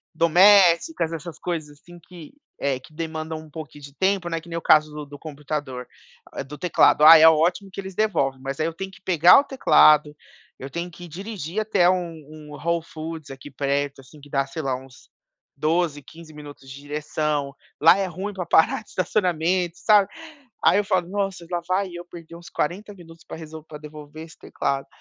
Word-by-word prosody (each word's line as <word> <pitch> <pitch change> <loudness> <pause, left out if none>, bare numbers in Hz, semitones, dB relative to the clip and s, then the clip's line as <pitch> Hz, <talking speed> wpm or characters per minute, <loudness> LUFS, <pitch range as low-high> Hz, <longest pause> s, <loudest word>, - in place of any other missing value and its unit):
domésticas, 175 - +4
essas 165 0 -7
coisas 160 -4 -5
assim 175 +3 -15
que, 175 - -13 0.3
eh, 140 -2 -1
que 130 - -18
demandam 160 0 -5
um 155 -1 -14
pouquinho 145 -2 -10
de 140 - -11
tempo, 190 +1 0
que 170 - -18
nem 170 - -4
o - - -4
caso 155 -1 +4
do 150 -1 -7
do 145 0 -12
computador, 145 -4 -6 0.6
do 150 - -9
teclado, 150 -2 +3
ah 160 +1 +11
é 160 - +7
ótimo 170 +5 +2
que 195 - -6
eles 190 0 -9
devolvem, 165 -11 0
mas 135 +1 -5
aí 155 - +1
eu 165 - -4
tenho 190 +3 -6
que 190 - -18
pegar 175 - +6
o - - 0
teclado, 155 - +4 0.4
eu 135 +1 -8
tenho 170 +3 -4
que 175 +1 -12
dirigir 185 +1 -6
até 205 -5 +2
um 180 -2 -1 0.2
um 155 -1 -12
Whole 170 +1 -2
Foods 160 -2 -8
aqui 135 +2 -10
perto, 140 +1 -2
assim 145 +3 -17
que 145 - -15
dá 140 -1 +1
sei 160 +4 -6
lá 135 -1 -1
uns 130 -1 -14 0.5
12, 155 0 0
15 160 +3 -14
minutos 145 -2 -12
de 135 +1 -10
direção, 150 -1 -3 0.3
lá 165 +4 +7
é 195 - 0
ruim 190 +4 -6
pra 180 -3 -5
parar 160 +6 +3
de - - -25
estacionamento, 180 -2 0
sabe? 205 -3 +4 0.6
Aí - - +5
eu - - 0
falo: 180 -3 0
"Nossa 195 -3 -3
lá 175 -1 -1
vai 185 +1 0
eu 175 0 -7
perder 170 -1 -12
uns 170 0 -12
40 200 +7 -3
minutos 165 -2 -15
pra - - -9
resolv 160 -1 -10
pra 150 - -9
devolver 150 +1 -11
esse 160 - -17
teclado." 135 0 -3
160 Hz, 195 wpm, -23 LUFS, 150-180 Hz, 0.6 s, ah